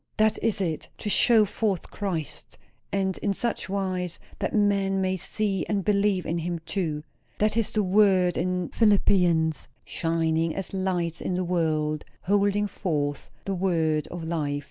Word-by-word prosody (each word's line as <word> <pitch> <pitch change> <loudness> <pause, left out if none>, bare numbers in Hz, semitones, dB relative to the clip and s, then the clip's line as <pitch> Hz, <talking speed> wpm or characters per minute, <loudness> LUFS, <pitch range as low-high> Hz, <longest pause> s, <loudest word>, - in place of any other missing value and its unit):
That 215 0 +3
is 225 -2 +1
it; 165 -4 -2
to 210 - -2
show 225 -1 +6
forth 205 -3 -2
Christ, 175 -8 -4 0.3
and 190 -1 -1
in 200 -1 -1
such 235 -3 -2
wise 185 -3 -2 0.2
that - - -1
men 200 -2 +2
may 190 0 +1
see 195 0 -1
and 200 -3 -1
believe 200 -2 +2
in 170 +1 -1
him 170 +1 -2
too. 160 -7 -2 0.3
That 215 0 +2
is 230 -2 +2
the 215 - +1
word 185 -2 +4
in 180 0 -1
Philippians 180 - +3 0.2
'shining 165 -1 0
as 195 - -5
lights 180 -3 -1
in 180 - -2
the 180 0 -1
world, 155 -3 0 0.2
holding 205 +1 +2
forth 150 -8 -2 0.2
the 195 - -1
word 165 -5 +1
of 175 -1 -7
life.' 150 -3 -1
185 Hz, 155 wpm, -26 LUFS, 165-200 Hz, 0.3 s, show